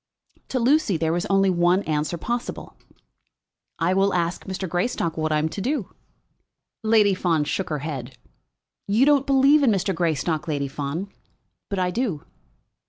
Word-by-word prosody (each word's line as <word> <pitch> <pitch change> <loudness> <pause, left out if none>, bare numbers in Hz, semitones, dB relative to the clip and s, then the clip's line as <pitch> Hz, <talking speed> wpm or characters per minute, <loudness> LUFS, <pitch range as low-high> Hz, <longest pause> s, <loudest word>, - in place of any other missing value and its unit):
To 265 - -2
Lucy 245 - +2
there 160 0 0
was 175 0 -1
only 195 -1 +3
one 175 +2 +2
answer 155 +2 -1
possible. 240 +7 -4 1.0
"I 170 +2 +1
will 195 0 +2
ask 170 0 -1
Mr. 190 0 -4
Greystock 175 -1 -1
what 155 -1 -1
I 155 - +2
am 155 +1 +1
to 195 - -5
do." 250 -2 -2 0.9
Lady 215 -2 +4
Fawn 170 -4 +1
shook 180 +6 -2
her 150 -2 -3
head. 130 -5 -6 0.7
"You 215 +6 +3
don't 285 -2 +3
believe 275 +2 +5
in 270 - +4
Mr. 195 -2 +1
Greystock, 165 -1 -1
Lady 145 -3 -1
Fawn; 150 +8 -4 0.6
but 200 - -3
I 180 -1 0
do." 190 - -2
180 Hz, 160 wpm, -23 LUFS, 160-210 Hz, 1.0 s, believe